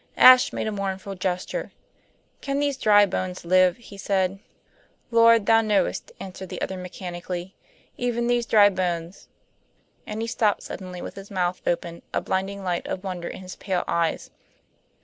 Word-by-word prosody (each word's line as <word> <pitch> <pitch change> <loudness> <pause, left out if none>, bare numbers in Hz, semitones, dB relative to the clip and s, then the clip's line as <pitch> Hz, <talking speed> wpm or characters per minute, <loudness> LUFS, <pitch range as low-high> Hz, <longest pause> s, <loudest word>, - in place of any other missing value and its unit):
Ashe 255 0 +8
made - - -3
a 215 - -1
mournful 195 -1 -4
gesture. 185 - -3 0.7
"Can 275 -1 -2
these 285 -1 0
dry 205 -4 +5
bones 185 -2 -4
live?" 185 +1 +4
he 225 -4 -13
said. 190 -1 0 0.7
"Lord 230 -2 +6
Thou 225 +1 +5
knowest," 215 - 0
answered 190 -1 -8
the - - -6
other 190 - -3
mechanically. 180 0 -6 0.4
"Even 240 -1 -1
these 240 -1 +1
dry 205 -2 +6
bones 180 -2 -3 0.4
" - - -40
And 215 +1 -5
he - - -3
stopped 225 -3 +1
suddenly 180 -2 -7
with - - -6
his 195 0 -11
mouth 180 -2 -1
open, 170 0 -2
a - - +3
blinding 195 +1 -3
light 175 -2 -2
of 185 - -4
wonder 180 -3 -4
in - - -7
his 185 - -8
pale 185 -3 -1
eyes. 170 -1 -1
190 Hz, 165 wpm, -24 LUFS, 180-215 Hz, 0.7 s, Ashe